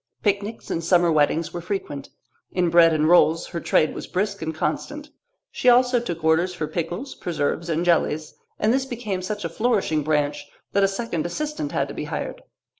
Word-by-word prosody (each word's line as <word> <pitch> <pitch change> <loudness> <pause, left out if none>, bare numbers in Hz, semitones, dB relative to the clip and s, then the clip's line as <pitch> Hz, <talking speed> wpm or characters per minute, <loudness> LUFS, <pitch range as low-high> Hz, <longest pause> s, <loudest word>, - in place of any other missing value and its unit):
Picnics 205 +2 -1
and 165 - -2
summer 175 0 +4
weddings 155 +2 +1
were 175 - -4
frequent. 170 -7 -4 0.4
In 175 -2 +1
bread 170 -1 +7
and 155 -1 +2
rolls 165 -1 +5
her 170 - -4
trade 155 -1 +2
was - - -7
brisk 200 +2 -2
and 160 0 -2
constant. 285 - -3 0.4
She 250 - +2
also 250 0 +5
took 170 -8 -5
orders 170 +3 +2
for 160 - -2
pickles, 175 - -4
preserves, 165 0 -2
and 165 +2 0
jellies, 155 -2 +1 0.2
and 220 +2 +2
this 265 0 +1
became 220 -7 -4
such 205 0 -4
a - - +1
flourishing 200 -6 +1
branch 145 -1 0 0.2
that 200 - +2
a - - +5
second 195 -5 -3
assistant 300 - -3
had - - 0
to - - -7
be - - -5
hired. - - -5
175 Hz, 190 wpm, -23 LUFS, 160-210 Hz, 0.4 s, bread